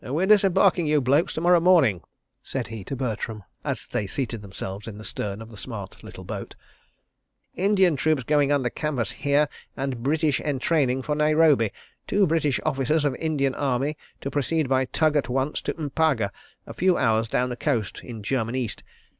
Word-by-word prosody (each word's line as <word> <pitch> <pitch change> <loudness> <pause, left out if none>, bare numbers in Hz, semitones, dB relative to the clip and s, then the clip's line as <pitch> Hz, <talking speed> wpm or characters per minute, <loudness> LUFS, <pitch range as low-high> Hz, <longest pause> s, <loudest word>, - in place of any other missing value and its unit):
"We're 155 +9 0
disembarking 195 -4 +4
you 150 0 +3
blokes 140 +7 +2
to 155 - -2
morrow 175 0 +5
morning," 165 - +4 0.4
said - - -4
he 110 -3 -7
to 135 - -4
Bertram, 110 -4 -3 0.2
as - - -3
they 105 - -1
seated 115 0 -3
themselves 95 +1 -7
in 105 -2 -7
the 105 - -9
stern 105 +1 -4
of 115 - -13
the 110 - -11
smart 100 -3 -8
little - - -10
boat. - - -6 1.0
"Indian 190 -5 +3
troops 155 0 +1
going 145 +2 +2
under 130 -4 +1
canvas 145 -7 -2
here, 145 +1 +2 0.3
and 135 -3 -3
British 150 +2 +1
entraining 135 -2 0
for 150 - -1
Nairobi. 150 -6 +4 0.4
Two 200 -1 +3
British 155 -4 +1
officers 150 +1 +1
of 140 - +2
Indian 145 -4 0
Army 140 +2 -1 0.3
to 140 - -4
proceed 145 +2 0
by 130 0 +2
tug 155 +3 +1
at 145 -3 +1
once 135 +3 -1
to - - -3
M'paga, 145 -8 +1 0.3
a - - -8
few 185 0 +2
hours 115 -3 +2
down 125 +3 0
the 125 - -3
coast, 120 -6 -1
in 115 -4 -8
German 120 0 -1
East. 120 -5 -3
140 Hz, 180 wpm, -25 LUFS, 120-155 Hz, 1.0 s, morrow